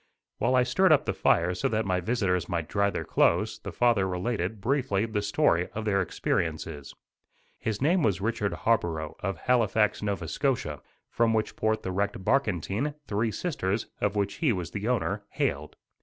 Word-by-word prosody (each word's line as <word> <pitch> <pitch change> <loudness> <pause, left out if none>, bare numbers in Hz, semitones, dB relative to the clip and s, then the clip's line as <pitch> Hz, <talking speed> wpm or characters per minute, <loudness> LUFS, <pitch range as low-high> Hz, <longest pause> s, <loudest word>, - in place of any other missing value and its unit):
While 130 - +2
I 125 - +5
stirred 160 +9 +3
up 150 - +5
the - - 0
fire 85 +2 +2
so 90 - -1
that 110 -1 0
my 90 -1 +1
visitors 90 -4 0
might 85 -3 -2
dry 100 +2 +1
their - - -4
clothes, - - +2
the - - -7
father 115 -6 +2
related, 95 +2 -2
briefly, 120 -3 0
the 110 -2 -2
story 100 - +2
of 110 0 -3
their 100 -2 +2
experiences. 80 -4 -2 0.6
His 110 +2 -2
name 175 +5 +3
was 100 - +1
Richard 105 -1 -1
Harborough, 85 -9 0
of 95 -2 -3
Halifax, 110 -2 +2
Nova 100 -5 -2
Scotia, 135 - -1 0.3
from 115 -1 +1
which 110 - -1
port 110 0 0
the 95 - -3
wrecked 100 0 -2
barkentine, 110 - 0
Three 110 +1 0
Sisters, 110 - -2
of 100 0 0
which 100 -1 -1
he 155 -6 +2
was 90 -6 -3
the 105 +1 -4
owner, 105 -4 0
hailed. 75 +2 -2
105 Hz, 175 wpm, -28 LUFS, 95-115 Hz, 0.6 s, I